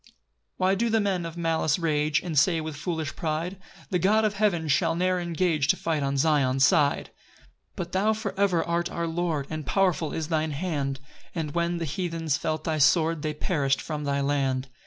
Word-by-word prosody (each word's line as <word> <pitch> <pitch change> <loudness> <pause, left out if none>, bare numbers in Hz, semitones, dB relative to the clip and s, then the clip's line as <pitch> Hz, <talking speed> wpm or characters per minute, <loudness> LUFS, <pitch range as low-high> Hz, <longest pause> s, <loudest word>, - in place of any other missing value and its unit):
PAUSE. - - -23
5 - - -26 0.4
Why 185 +1 +2
do 230 +4 +1
the 225 0 +3
men 190 -4 0
of 165 0 -9
malice 165 -3 +1
rage, 150 -3 +1
And 170 -3 -4
say 165 +2 +3
with 155 -1 -5
foolish 160 -1 -3
pride, 165 +4 -3 0.3
"The 180 - +2
God 215 +5 +3
of 210 - +1
heaven 195 -6 +1
will 165 -2 +1
ne'er 185 +1 +1
engage 170 -4 0
To - - +4
fight 160 -3 -1
on 140 0 -1
Zion's 135 -3 +3
side?" 145 -1 +2 0.3
6 - - -27 0.3
But 175 0 -5
thou 200 +3 +2
for 215 -3 -4
ever 190 -4 +2
art 170 0 -1
our 170 - -3
Lord; 165 -3 -1
And 155 -1 -4
pow'rful 170 +1 +1
is 160 -1 -3
thine 155 -2 0
hand, 140 -4 -2 0.4
As 155 -3 -3
when 170 0 0
the 170 - -2
heathens 165 -1 -2
felt 155 0 -2
thy 155 -1 -1
sword, 160 +2 +3
And 150 -1 -3
perish'd 140 -6 +1
from 150 -2 -4
thy 140 -1 0
land. 135 -2 0
165 Hz, 205 wpm, -26 LUFS, 150-180 Hz, 0.4 s, To